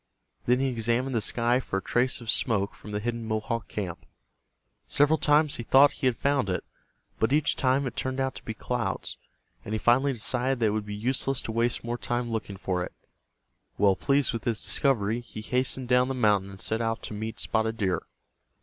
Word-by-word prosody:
Then 125 +1 +4
he 135 0 +1
examined 120 +2 0
the 115 - +1
sky 120 +4 +1
for 105 -6 -3
a - - -2
trace 125 +1 +1
of 115 - -8
smoke 100 -5 +1
from - - -12
the 105 - -1
hidden 115 +1 -3
Mohawk 110 +1 -2
camp. 90 -5 -5 0.8
Several 150 +2 +3
times 150 0 +3
he 120 - -4
thought 135 +4 +6
he 130 - -1
had 125 - +1
found 140 -7 +1
it, 90 - -1 0.6
but 110 - +2
each 150 +2 +3
time 135 +1 +2
it 125 - -4
turned 130 0 -2
out 135 0 0
to - - -10
be 110 - -5
clouds, - - -3 0.5
and 110 - -3
he - - +1
finally 130 +5 +3
decided 125 +2 0
that 115 - +2
it - - +4
would 105 -1 -2
be 105 - -4
useless 130 +4 0
to - - -4
waste 115 +1 0
more 120 +1 -3
time 120 -1 -2
looking 105 -3 -4
for 90 -2 -1
it. - - -7 0.8
Well 100 -1 +4
pleased 140 +3 +1
with 115 - -4
his 115 -3 0
discovery, 115 -5 +1
he 115 -2 -9
hastened 125 +2 -1
down 125 +1 +4
the 135 - -2
mountain 105 -5 +2
and 95 0 -11
set 110 +1 0
out 115 0 -2
to - - -5
meet 110 0 -5
Spotted 110 +1 0
Deer. 95 -5 0
120 Hz, 210 wpm, -27 LUFS, 110-130 Hz, 0.8 s, thought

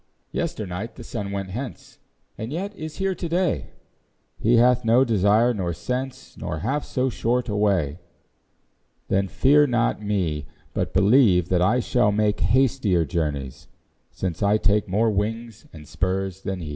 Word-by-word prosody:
Yester 170 - -3
night 95 +5 -6
the 120 - -10
sun 105 -4 -5
went 100 -1 -4
hence, 125 +5 -7 0.4
And 110 +3 -6
yet 195 +6 -4
is 155 -2 -7
here 195 0 0
to 170 -1 -5
day; 170 - 0 0.7
He 120 +3 +3
hath 125 +1 +4
no 120 +3 +4
desire 110 +2 +3
nor 90 -5 -2
sense, 130 +6 -5
Nor 80 - -4
half 135 - -1
so 130 0 -1
short 125 0 -1
a 105 - -2
way: 90 -7 +1 1.1
Then 95 0 +1
fear 145 +8 +4
not 120 -4 0
me, 90 -9 -1 0.3
But - - -2
believe 100 -4 +4
that 90 -1 +2
I 125 +8 +3
shall 120 -3 +2
make 105 0 +1
Hastier 105 -5 +2
journeys, 70 -4 -3 0.4
since 90 -4 -4
I 105 +1 +3
take 105 0 +1
More 110 +4 +2
wings 115 +3 -3
and 75 -2 -12
spurs 95 +2 -2
than 95 -2 -4
he. 80 - -6
105 Hz, 160 wpm, -24 LUFS, 95-125 Hz, 1.1 s, hath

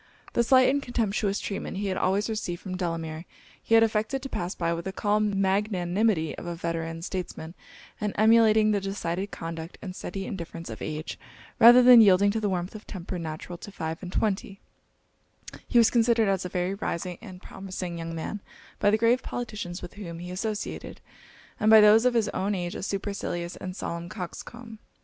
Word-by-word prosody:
The 235 - +3
slight 255 +1 +5
and 280 +2 +2
contemptuous 215 -5 -1
treatment 195 -1 -4
he 205 - -2
had 190 -1 -1
always 195 +3 +1
received 210 -6 -3
from 185 -2 -5
Delamere, 165 -2 -4 0.4
he 225 - +2
had 225 - +7
affected 225 +4 0
to 270 - -5
pass 175 -4 -3
by 170 -1 0
with 170 +1 -5
the 190 - -3
calm 205 0 0
magnanimity 190 -3 +1
of - - -8
a 170 - -3
veteran 165 -1 -4
statesman; 175 -3 -5 0.5
and 210 -1 0
emulating 220 -1 +5
the 205 -1 +1
decided 195 -1 -3
conduct 165 -1 -7
and 185 -3 -7
steady 195 +1 -5
indifference 170 -4 -6
of - - -8
age, 155 +1 -5 0.4
rather 240 +2 +9
than 245 -1 +9
yielding 200 -1 +5
to 220 - -1
the 210 -2 0
warmth 180 -1 -2
of 215 -1 -11
temper 185 -1 -6
natural 165 +2 -6
to 205 - -9
five 160 -4 -5
and 180 -2 -7
twenty, 195 -1 -1 1.1
he - - +1
was 230 -2 +6
considered 230 -2 +3
as 190 -2 0
a - - -3
very 180 +1 -1
rising 180 -3 -4
and 185 -5 -11
promising 185 -3 -6
young 165 0 -5
man 195 +5 -5 0.4
by 205 - +4
the 215 - +3
grave 230 +3 +3
politicians 210 -7 -5
with - - -8
whom 175 -5 -8
he 175 +1 -7
associated, 210 +3 -4 0.6
and 215 - +3
by 220 0 +9
those 215 +2 +7
of 250 -1 +3
his 225 -3 +2
own 200 +2 -1
age 175 -1 -3
a - - -6
supercilious 190 -3 -3
and 185 -1 -6
solemn 170 -2 -5
coxcomb. 220 +4 -8
195 Hz, 190 wpm, -27 LUFS, 175-215 Hz, 1.1 s, rather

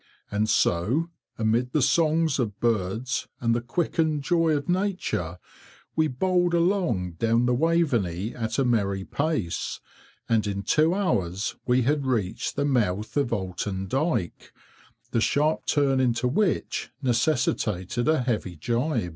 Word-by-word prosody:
And 105 +1 0
so, 120 - +1 0.3
amid 115 +3 0
the 150 - +2
songs 155 +1 +2
of 105 -5 -2
birds 115 +2 -1
and 115 -1 +1
the 120 - 0
quickened 155 +3 0
joy 165 -1 +2
of 140 - -5
nature, 180 - -1 0.6
we 160 0 +3
bowled 175 +5 +1
along 170 - +1
down 115 +1 +2
the 125 - +2
Waveney 120 - +1
at 115 0 -3
a 135 - +2
merry 100 -5 +1
pace, 145 - -2 0.5
and 110 -2 +2
in 100 0 -3
two 160 - +3
hours 100 - -1
we 125 0 +3
had 140 +1 0
reached 110 -8 -1
the 145 - 0
mouth 105 -7 0
of 140 -4 +1
Oulton 95 -1 -3
Dyke, 135 - -2 0.6
the 115 - +1
sharp 150 +6 +1
turn 140 -3 +2
into 125 -1 +1
which 180 +9 0
necessitated 120 - 0
a 155 -5 +3
heavy 110 -7 -2
gibe. 120 - -1
125 Hz, 140 wpm, -26 LUFS, 105-155 Hz, 0.6 s, we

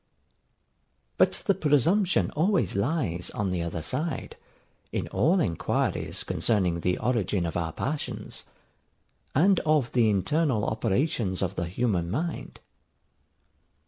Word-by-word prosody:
But - - +3
the 200 - +4
presumption 170 - +2
always 165 - +1
lies 100 - -1
on 100 -3 -1
the 90 -2 -1
other 85 -1 -4
side, 160 - -3 0.6
in - - -2
all 180 +5 +2
enquiries 85 - -1
concerning 90 -6 +1
the 90 +2 0
origin 105 -6 0
of 85 - -4
our 80 -2 -1
passions, 145 - -4 0.9
and 185 +6 +4
of 150 -5 +1
the 115 -3 +3
internal 115 - +1
operations 110 - 0
of 95 0 -1
the 90 - -2
human 90 -3 -1
mind. 160 - -4
115 Hz, 115 wpm, -27 LUFS, -, 0.9 s, the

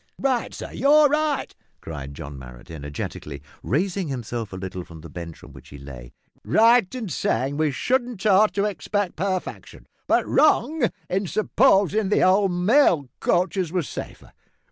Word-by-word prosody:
"Right, 260 -3 0
sir; - - -8
you're 295 +2 +5
right," 300 -1 0 0.3
cried 70 -3 -8
John 70 0 -8
Marrot 60 +2 -12
energetically, 75 -1 -7 0.2
raising 180 - -1
himself 120 -5 -5
a - - -7
little 95 -1 -6
from 80 -2 -13
the 80 -1 -11
bench 85 -1 -8
on - - -13
which - - -14
he 70 - -11
lay, 65 -4 -11 0.3
"right 230 -2 +4
in 240 -4 -4
sayin' 140 -3 -1
we 155 0 +1
shouldn't 240 - -1
ought 210 +1 +5
to 200 0 +1
expect 205 0 -2
parfection, 185 +2 -4 0.2
but - - +2
wrong 300 -3 +3 0.2
in 190 +1 -1
supposin' 210 - +2
the - - +3
old 190 +1 +4
mail 180 - +3
coaches 180 -1 0
was 180 -5 -1
safer. - - -8
185 Hz, 155 wpm, -23 LUFS, -, 0.3 s, you're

